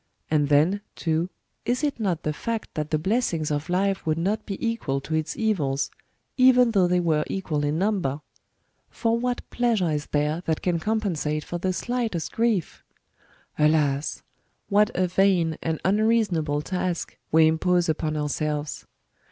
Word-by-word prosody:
And 145 Hz, -2 st, +2 dB
then, 160 Hz, +8 st, +3 dB
too, 165 Hz, +2 st, -1 dB, 0.3 s
is 250 Hz, +4 st, -1 dB
it 290 Hz, -4 st, -1 dB
not 185 Hz, -7 st, -1 dB
the 150 Hz, -, -1 dB
fact 230 Hz, +7 st, -4 dB
that 155 Hz, -1 st, -3 dB
the 155 Hz, -, +1 dB
blessings 165 Hz, -4 st, 0 dB
of 145 Hz, +3 st, -2 dB
life 195 Hz, +2 st, +1 dB
would 155 Hz, -1 st, 0 dB
not 205 Hz, +6 st, -1 dB
be 195 Hz, -, -3 dB
equal 210 Hz, -12 st, -1 dB
to 160 Hz, -, -6 dB
its 155 Hz, 0 st, -1 dB
evils, 155 Hz, -12 st, 0 dB, 0.5 s
even 250 Hz, -2 st, +6 dB
though 190 Hz, -5 st, +3 dB
they 180 Hz, 0 st, +2 dB
were 160 Hz, -3 st, +2 dB
equal 155 Hz, -6 st, -2 dB
in 145 Hz, +2 st, 0 dB
number? 180 Hz, -8 st, 0 dB, 0.7 s
For 230 Hz, -1 st, 0 dB
what 245 Hz, 0 st, -2 dB
pleasure 225 Hz, -9 st, +1 dB
is 150 Hz, -1 st, -2 dB
there 150 Hz, +3 st, 0 dB
that 160 Hz, -1 st, -1 dB
can 175 Hz, -2 st, +1 dB
compensate 165 Hz, -8 st, -1 dB
for 175 Hz, -, -5 dB
the 185 Hz, +2 st, 0 dB
slightest 225 Hz, -4 st, -2 dB
gi'ief? 225 Hz, -7 st, 0 dB, 0.8 s
Alas! 150 Hz, -2 st, +2 dB, 0.5 s
what 205 Hz, +1 st, +4 dB
a 185 Hz, -, +2 dB
vain 180 Hz, -3 st, +2 dB
and 160 Hz, -1 st, -2 dB
unreasonable 190 Hz, -8 st, +2 dB
task 180 Hz, -1 st, -3 dB, 0.2 s
we 160 Hz, 0 st, +6 dB
impose 175 Hz, +2 st, +2 dB
upon 155 Hz, -1 st, -1 dB
ourselves! 150 Hz, 0 st, -2 dB
175 Hz, 155 wpm, -25 LUFS, 155-210 Hz, 0.8 s, even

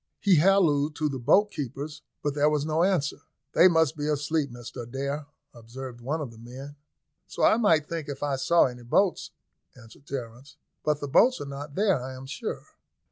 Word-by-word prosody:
He 195 Hz, -4 st, +4 dB
hallooed 155 Hz, -4 st, +3 dB
to 155 Hz, -1 st, 0 dB
the 135 Hz, -2 st, -4 dB
boat 205 Hz, -, +4 dB
keepers, 145 Hz, -, -6 dB, 0.2 s
but 145 Hz, -, 0 dB
there 145 Hz, +1 st, +3 dB
was 150 Hz, -1 st, 0 dB
no 155 Hz, +1 st, 0 dB
answer. 180 Hz, -7 st, 0 dB, 0.3 s
"They 180 Hz, -, +7 dB
must 160 Hz, -3 st, +3 dB
be 150 Hz, -1 st, -3 dB
asleep, 150 Hz, 0 st, 0 dB
Mr 120 Hz, 0 st, -8 dB
Adair," 140 Hz, +5 st, -4 dB, 0.3 s
observed 120 Hz, +1 st, -9 dB
one 150 Hz, +6 st, -2 dB
of 135 Hz, -6 st, -5 dB
the 115 Hz, -, -15 dB
men. 130 Hz, +5 st, -10 dB, 0.5 s
"So -, -, -4 dB
I -, -, +5 dB
might 165 Hz, -10 st, +3 dB
think 165 Hz, -4 st, -5 dB
if 140 Hz, 0 st, -5 dB
I 140 Hz, -2 st, 0 dB
saw 170 Hz, +5 st, +4 dB
any 125 Hz, -1 st, -5 dB
boats," 175 Hz, +10 st, +1 dB, 0.5 s
answered 120 Hz, +4 st, -16 dB
Terence. 125 Hz, 0 st, -7 dB, 0.3 s
"But 150 Hz, -1 st, 0 dB
the 145 Hz, -, -3 dB
boats 250 Hz, -, +4 dB
are -, -, -5 dB
not 140 Hz, +1 st, -8 dB
there, 195 Hz, -8 st, +2 dB
I 130 Hz, 0 st, -6 dB
am 130 Hz, +1 st, -9 dB
sure." 130 Hz, -, -5 dB
145 Hz, 190 wpm, -27 LUFS, 130-160 Hz, 0.5 s, They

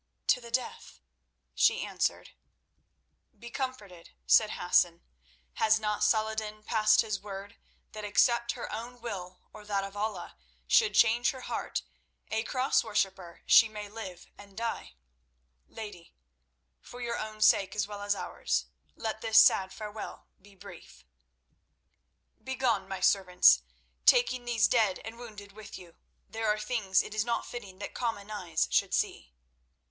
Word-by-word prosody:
"To 250 Hz, -, +4 dB
the 235 Hz, -, -10 dB
death," 250 Hz, +2 st, -4 dB, 0.5 s
she -, -, +3 dB
answered. -, -, -2 dB, 1.1 s
"Be 235 Hz, 0 st, -11 dB
comforted," 205 Hz, -, -6 dB
said 65 Hz, +2 st, +5 dB
Hassan. -, -, +2 dB, 0.5 s
"Has 220 Hz, 0 st, +4 dB
not 210 Hz, -1 st, -1 dB
Salah 220 Hz, -1 st, +2 dB
ed 220 Hz, -, -8 dB
din 215 Hz, 0 st, -8 dB
passed 215 Hz, -1 st, +4 dB
his 215 Hz, -4 st, -3 dB
word 200 Hz, +1 st, -8 dB, 0.4 s
that 215 Hz, 0 st, -8 dB
except 235 Hz, +3 st, +2 dB
her 240 Hz, -, -7 dB
own 240 Hz, +3 st, -7 dB
will 185 Hz, -6 st, -7 dB
or 215 Hz, -, -11 dB
that 200 Hz, -1 st, -1 dB
of 195 Hz, +1 st, -8 dB
Allah 205 Hz, -3 st, -4 dB, 0.3 s
should 450 Hz, -4 st, +3 dB
change 235 Hz, +1 st, +4 dB
her 260 Hz, -, -5 dB
heart, -, -, -4 dB, 0.5 s
a 220 Hz, -, +1 dB
Cross 255 Hz, +3 st, +1 dB
worshipper 195 Hz, -5 st, -2 dB
she 225 Hz, -, +7 dB
may 210 Hz, -1 st, -7 dB
live 200 Hz, -5 st, -9 dB
and 200 Hz, -1 st, -15 dB
die? 230 Hz, -, -4 dB, 0.7 s
Lady, 205 Hz, -, -10 dB, 0.6 s
for 245 Hz, -, -12 dB
your 235 Hz, -1 st, -3 dB
own 215 Hz, 0 st, -6 dB
sake 195 Hz, -2 st, +4 dB
as 205 Hz, -1 st, -1 dB
well 205 Hz, -1 st, -8 dB
as 205 Hz, 0 st, 0 dB
ours, -, -, -2 dB, 0.3 s
let 220 Hz, -1 st, -4 dB
this 225 Hz, -1 st, +2 dB
sad 190 Hz, -3 st, +5 dB
farewell 210 Hz, +1 st, -8 dB, 0.2 s
be 200 Hz, 0 st, -19 dB
brief. 180 Hz, -, -14 dB, 1.4 s
Begone, 245 Hz, -7 st, 0 dB
my 195 Hz, -1 st, -5 dB
servants, 185 Hz, -1 st, +5 dB, 0.5 s
taking 370 Hz, -, +4 dB
these 230 Hz, -4 st, +3 dB
dead 215 Hz, -6 st, +2 dB
and 225 Hz, +1 st, -8 dB
wounded 210 Hz, -4 st, -10 dB
with 215 Hz, 0 st, -10 dB
you. 175 Hz, -3 st, -14 dB, 0.3 s
There 225 Hz, 0 st, -3 dB
are 210 Hz, 0 st, +2 dB
things 210 Hz, -3 st, +1 dB
it 210 Hz, -, -9 dB
is 215 Hz, -1 st, +1 dB
not 235 Hz, 0 st, -2 dB
fitting 200 Hz, -6 st, -9 dB
that 205 Hz, -, -7 dB
common 215 Hz, -4 st, -3 dB
eyes 175 Hz, -6 st, -1 dB
should -, -, +2 dB
see." 65 Hz, -2 st, -2 dB
215 Hz, 150 wpm, -29 LUFS, 195-230 Hz, 1.4 s, she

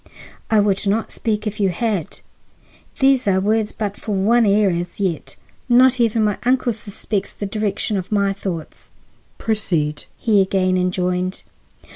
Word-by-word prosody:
"I 220 Hz, -, +4 dB
would 200 Hz, 0 st, +1 dB
not 215 Hz, +3 st, 0 dB
speak 215 Hz, -1 st, -2 dB
if 215 Hz, 0 st, -4 dB
you 195 Hz, -2 st, +3 dB
had. 195 Hz, -1 st, -2 dB, 0.8 s
These 265 Hz, -3 st, +3 dB
are 190 Hz, -1 st, +3 dB
words 215 Hz, +2 st, +1 dB
for -, -, -22 dB
but 205 Hz, -, -18 dB
one 215 Hz, +3 st, +3 dB
ear 200 Hz, -1 st, +4 dB
as 175 Hz, +2 st, -4 dB
yet. 185 Hz, -5 st, -2 dB, 0.3 s
Not 255 Hz, +1 st, +5 dB
even 230 Hz, -1 st, +2 dB
my 210 Hz, -2 st, 0 dB
uncle 250 Hz, -1 st, +1 dB
suspects 205 Hz, -1 st, -4 dB
the 205 Hz, -, -5 dB
direction 205 Hz, 0 st, -1 dB
of 185 Hz, +1 st, -5 dB
my 200 Hz, -1 st, +2 dB
thoughts." 180 Hz, -5 st, -6 dB, 0.5 s
"Proceed," 165 Hz, -9 st, -1 dB
he 210 Hz, -4 st, +3 dB
again 190 Hz, -1 st, +1 dB
enjoined. 180 Hz, 0 st, -1 dB
205 Hz, 150 wpm, -20 LUFS, 190-220 Hz, 0.8 s, Not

